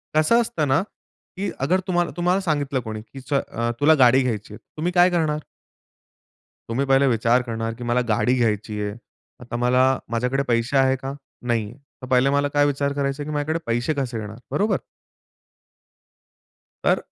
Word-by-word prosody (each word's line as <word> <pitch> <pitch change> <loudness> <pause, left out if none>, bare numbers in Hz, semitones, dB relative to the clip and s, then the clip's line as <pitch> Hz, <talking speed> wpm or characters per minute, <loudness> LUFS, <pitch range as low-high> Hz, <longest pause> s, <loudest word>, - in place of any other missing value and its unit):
कसं 155 +10 +4
असतं 220 -10 -1
ना, 135 +4 +3 0.6
की 200 +2 -2
अगर 165 +8 +2
तुम्हाला 175 -2 +1
तुम्हाला 180 +2 +2
सांगितलं 145 -6 0
कोणी, 110 -2 -6
की 135 +5 -12 0.2
अ, 120 -3 -1
तुला 150 +2 +6
गाडी 130 +1 +6
घ्यायची 110 -4 -3
आहे, - - -8 0.2
तुम्ही 170 +3 -1
काय 175 0 +6
करणार? 160 -4 0 1.3
तुम्ही 130 +5 0
पहिले 135 0 +4
विचार 120 0 +3
करणार, 115 -2 -3
की 120 +2 -9
मला 120 +1 +1
गाडी 115 +3 +2
घ्यायची 105 -2 0
आहे. 105 0 -3 0.4
आता 120 -1 -7
मला 125 +1 +3 0.3
माझ्याकडे 125 +4 0
पैसे 120 +3 +1
आहेत 135 0 +3
का? 135 +1 -4 0.3
नाही 115 -3 +1
आहे. 115 +6 -11 0.2
तर 130 - -7
पहिले 130 +1 +3
मला 145 +1 +2
काय 145 0 +4
विचार 140 0 0
करायचा 140 0 -2
आहे, 150 - -7
की - - -3
माझ्याकडे 150 +3 -1
पैसे 120 +6 0
कसे 120 -3 -3
येणार? 105 0 -7
बरोबर? 210 +2 +1 2.1
तर - - +3
135 Hz, 170 wpm, -23 LUFS, 120-150 Hz, 2.1 s, तुला